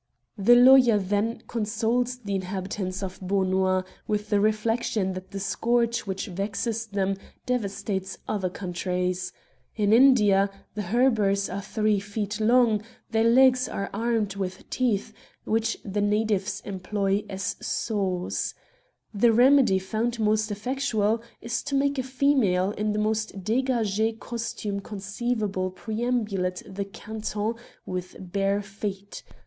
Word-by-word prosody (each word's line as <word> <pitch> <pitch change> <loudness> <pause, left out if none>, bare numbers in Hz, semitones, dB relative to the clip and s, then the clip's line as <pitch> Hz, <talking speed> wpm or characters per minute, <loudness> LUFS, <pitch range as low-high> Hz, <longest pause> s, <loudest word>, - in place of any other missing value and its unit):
The 240 +5 +6
lawyer 250 -2 +7
then 205 +4 -1
consoles 230 +2 0
the 205 -5 -5
inhabitants 190 0 -3
of 190 -1 -6
Beaunois 185 -1 +1 0.2
with 210 0 -2
the 205 - +4
reflection 215 -2 +1
that 185 0 -8
the 195 - -5
scourge 235 +3 +1
which 190 0 -3
vexes 210 +4 -3
them 195 -1 -1 0.3
devastates 200 -5 -2
other 195 -4 -1
countries. 180 0 -2 0.4
In 210 -1 +2
India 210 -6 +5 0.2
the 210 - -3
httreburs 205 -3 +2
are 200 - -3
three 210 0 +1
feet 205 +1 -4
long, 225 -1 +4 0.3
their 225 0 +2
legs 255 +1 +5
are 200 - -4
armed 220 -2 0
with 190 -1 -5
teeth, 220 -4 0 0.3
which 225 +1 0
the 205 0 -1
natives 205 -1 0
employ 195 +1 -1
as 190 -1 -3
saws. 190 -5 -2 0.6
The 230 +3 +4
remedy 250 -3 +5
found 225 +5 -2
most 215 0 +2
effectual 220 0 0 0.2
is 230 +1 -2
to 280 -1 -3
make 280 0 +1
a - - +2
female 255 -8 +2
in 210 0 -1
the - - -2
most 215 -2 -1
d^gag^ 225 -2 +1
costume 225 -3 -4
conceivable 205 -1 -2
perambulate 215 -3 -2
the 195 +1 -4
canton 215 +1 -4 0.3
with 180 0 -5
bare 195 +2 -1
feet. 200 0 -6
210 Hz, 125 wpm, -26 LUFS, 195-230 Hz, 0.6 s, lawyer